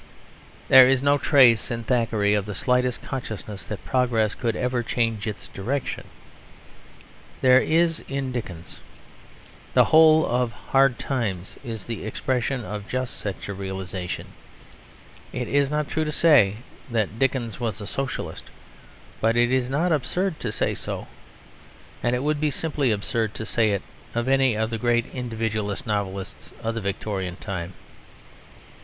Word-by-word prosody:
There 130 -1 +9
is 135 0 +2
no 145 0 +4
trace 130 -6 +5
in 115 -1 -3
Thackeray 115 -4 +1
of 105 -1 0
the 105 - -5
slightest 125 +2 +1
consciousness 110 -5 -6
that 105 -4 -7
progress 120 -5 +1
could 115 -3 -2
ever 125 -1 0
change 115 -2 -1
its 105 - -5
direction. 125 +8 -4 1.3
There 130 0 +7
is 165 0 +2
in 135 -1 -2
Dickens. 90 -9 -6 1.0
The - - +7
whole 160 0 +6
of 125 -1 0 0.2
Hard 135 -2 +4
Times 100 -9 -3
is 115 -5 -5
the 115 -2 -5
expression 125 +2 -1
of 105 +1 -6
just 130 -1 -3
such 100 -2 -5
a 100 - -4
realisation. 95 -2 -5 1.0
It - - -3
is 140 -1 +2
not 150 -1 -1
true 160 - -1
to 150 - -2
say 145 -12 +5 0.3
that 110 -1 -1
Dickens 125 -5 0
was 115 -4 -2
a 105 - -6
Socialist, 135 +5 -4 0.7
but 115 +1 +2
it 120 +1 +3
is 130 -1 +1
not 160 +6 +1
absurd 170 +4 0
to 115 - -3
say - - 0
so. - - -5 1.0
And 120 +1 +1
it 125 - -2
would 150 0 0
be 155 - +2
simply 145 -2 -1
absurd 110 +1 -1
to 110 - -5
say 110 0 +2
it 100 -2 -1 0.3
of 120 +1 0
any 135 -3 +3
of 110 +1 -1
the 115 - -2
great 120 0 +2
Individualist 110 -4 -3
novelists 100 -3 -4
of 115 - -1
the 115 - -3
Victorian 95 -2 -3
time. 95 -3 -5
120 Hz, 150 wpm, -24 LUFS, 105-135 Hz, 1.3 s, There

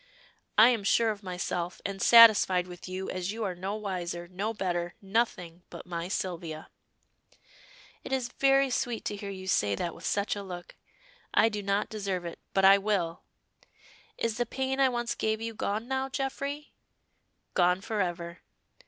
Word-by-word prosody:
"I 220 +3 +9
am 230 -5 0
sure 225 +3 +3
of 205 -1 -7
myself, 180 -2 -3
and 195 -1 -4
satisfied 215 -6 +7
with 180 0 -10
you, 185 +1 -4
as 185 +1 -3
you 225 +1 -4
are 190 -3 -1
no 190 +3 -4
wiser, 175 -4 -4
no 195 +5 -3
better, 175 -5 -2
nothing 190 -5 -1
but - - -10
my 170 -1 -4
Sylvia." 170 -5 -4 1.3
"It - - -8
is 260 -2 -1
very 275 -1 +4
sweet 245 -2 -2
to 205 - -2
hear 200 0 -6
you 190 -1 -7
say 100 - +2
that 170 - -3
with - - -13
such 205 +1 0
a 205 - -5
look. 180 -3 -8 0.6
I 225 - +5
do 210 -1 -4
not 200 +1 0
deserve 195 -4 -3
it 170 - -7
but 195 0 +3
I 195 +1 +8
will. 195 -5 -1 1.0
Is 230 -1 -1
the 240 -1 0
pain 265 +2 -2
I 270 -1 +5
once 240 -1 -2
gave 220 0 -1
you 225 0 -4
gone 215 +2 -2
now, 265 0 -1
Geoffrey?" 280 +2 -4 0.8
"Gone 180 0 +3
forever." 175 -5 -3
200 Hz, 170 wpm, -29 LUFS, 180-230 Hz, 1.3 s, I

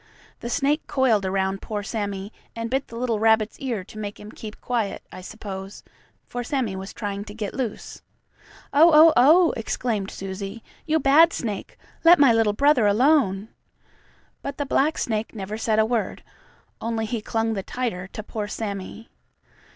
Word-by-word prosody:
The 235 - -5
snake 285 +5 0
coiled 230 -8 +2
around 190 0 -1
poor 210 -2 -4
Sammie, 200 -2 -4 0.2
and 230 0 -4
bit 270 +1 0
the 230 - -11
little 235 -2 -1
rabbit's 220 0 +2
ear 240 -8 -3
to 215 +3 -11
make 205 -1 -6
him 210 +1 -10
keep 215 -1 -9
quiet, 230 -5 -2
I 185 - -9
suppose, 195 -1 -8 0.4
for 245 0 -5
Sammie 245 -6 -2
was 190 +1 -6
trying 205 -2 -4
to 205 -1 -10
get 210 -3 -4
loose. 245 -5 -5 0.7
"Oh, 320 +4 +7
oh, 315 +1 +8
oh!" 320 +7 +6
exclaimed 220 -3 -2
Susie. 195 +3 -6 0.2
"You 320 +1 +2
bad 310 +4 +6
snake! 210 -5 -5 0.3
Let 340 +1 +8
my 275 -5 +6
little 225 -2 +3
brother 275 -2 +4
alone." 220 -3 +3 0.9
But 280 0 -5
the 285 - -2
black 290 +3 +1
snake 220 0 -2
never 205 0 -5
said 220 0 0
a 220 - +4
word, 230 -1 -2 0.6
only 225 -1 -2
he 220 0 -3
clung 225 +1 -1
the 200 - -2
tighter 205 -5 -4
to 215 - -8
poor 210 -1 -4
Sammie. 210 +1 -6
220 Hz, 165 wpm, -24 LUFS, 205-255 Hz, 0.9 s, oh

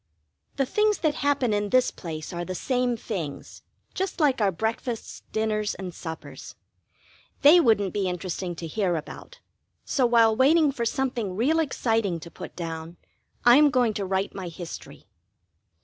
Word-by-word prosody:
The 270 - +1
things 425 +9 +2
that 310 -3 +2
happen 280 -6 +1
in 205 0 0
this 255 +2 +3
place 155 -2 -7
are 175 0 -3
the 185 +1 -5
same 250 +3 0
things, 175 -11 -6 0.3
just 380 -1 -3
like 275 -6 +3
our 200 -2 +3
breakfasts, 225 +5 -4
dinners, 215 -1 -1
and 185 -2 -7
suppers. 160 -1 -8 0.9
They 305 +5 +9
wouldn't 215 - +3
be 195 -3 0
interesting 180 0 -4
to 165 - -7
hear 180 +1 0
about, 325 - -8 0.4
so 255 -3 +2
while 230 -2 +4
waiting 295 +4 +4
for 235 -3 -3
something 240 -6 -1
real 280 +10 +2
exciting 225 - 0
to 170 - -10
put - - -9
down, 165 0 -6 0.5
I 240 +1 +8
am 300 0 +6
going 245 -4 +2
to 200 -1 -3
write 190 +1 -1
my 190 -2 -6
history. 165 -4 -9
220 Hz, 160 wpm, -26 LUFS, 180-260 Hz, 0.9 s, They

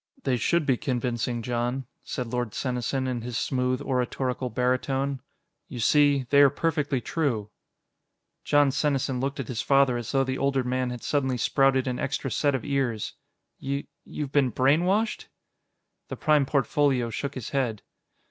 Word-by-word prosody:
"They 130 -2 +1
should 155 +7 +1
be 130 -3 +2
convincing, 120 -2 -2
Jon," 120 +2 -2 0.2
said 125 - -4
Lord 120 -2 -3
Senesin 130 +1 -1
in 125 -2 -2
his 120 0 -4
smooth 125 -1 0
oratorical 125 0 -1
baritone. 130 +3 0 0.5
"You 125 - -7
see, 145 +2 +4
they 140 0 +7
are 140 - +8
perfectly 145 -2 0
true." 120 -9 -2 0.9
Jon 145 -1 +4
Senesin 135 -2 0
looked 140 +1 -2
at 130 - -3
his 120 -3 -3
father 135 -3 +3
as 120 -3 -5
though 135 -1 +3
the 130 0 -3
older 135 -1 +1
man 125 0 -1
had 125 -1 -6
suddenly 130 -3 0
sprouted 135 +2 +2
an 125 -2 -2
extra 135 -1 -2
set 145 -2 +1
of 130 - -4
ears. 135 -7 -1 0.5
"Y... 140 +1 -3 0.2
You've 145 -3 -5
been 140 -4 +3
brainwashed?" 175 - +2 0.8
The - - -6
Prime 150 -3 +3
Portfolio 135 -3 +1
shook 140 +5 -4
his 130 -4 -6
head. 125 -7 -1
130 Hz, 155 wpm, -26 LUFS, 125-140 Hz, 0.9 s, are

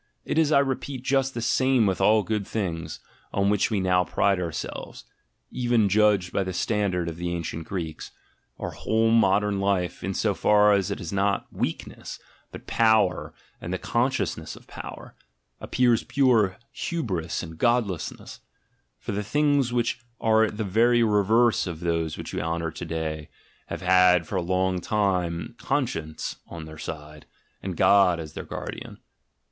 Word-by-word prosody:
It - - 0
is, 155 -2 +3
I 150 - +6
repeat, 135 -1 -1
just 135 -1 +1
the 115 - -3
same 130 -1 +3
with 95 -2 0
all 110 0 +4
good 100 +1 -2
things, 85 -7 -4 0.3
on 100 0 +1
which 105 - +2
we 105 -3 0
now 90 -1 +3
pride 100 +1 +1
ourselves; 85 -3 -5 0.5
even 120 -4 +2
judged 100 -3 +3
by 100 - +1
the 95 0 -4
standard 90 -2 0
of 85 -1 -5
the 85 0 -3
ancient 85 -1 -4
Greeks, 80 -5 -5 0.5
our - - -4
whole 115 +1 +1
modern 105 -2 +3
life, 100 -3 -1
in 95 0 -2
so 105 -2 +1
far 105 +3 +4
as 100 -3 +1
it - - -3
is 85 - -6
not 100 0 +1
weak - - -2
ness, - - -9 0.3
but - - -10
power 110 -5 +2 0.3
and 85 - -5
the 95 - -1
consciousness 125 +7 -1
of - - -15
power, - - -9 0.5
appears 120 -2 +2
pure 115 -8 +2 0.2
"Hybris" 95 - -3
and 80 0 -9
godlessness: 115 -8 -1 0.6
for - - -6
the 100 +1 -2
things 145 +2 +1
which 120 0 0 0.2
are 110 -1 +3
the 110 +1 -4
very 115 +4 +3
reverse 110 +1 +3
of 85 -3 -5
those 85 -2 -1
which - - -7
we - - -2
honour 80 0 -2
to 85 +2 -7
day, 80 -2 -4 0.4
have - - -6
had 90 -1 +5
for 100 - -2
a - - +1
long 95 +1 0
time 90 -5 -1
conscience 80 - -2
on 80 -2 -8
their 80 0 -11
side, 75 -1 -8 0.3
and 95 -3 -5
God 95 -4 +5
as 80 -2 -7
their - - -6
guardian. - - -7
100 Hz, 165 wpm, -25 LUFS, 85-115 Hz, 0.6 s, I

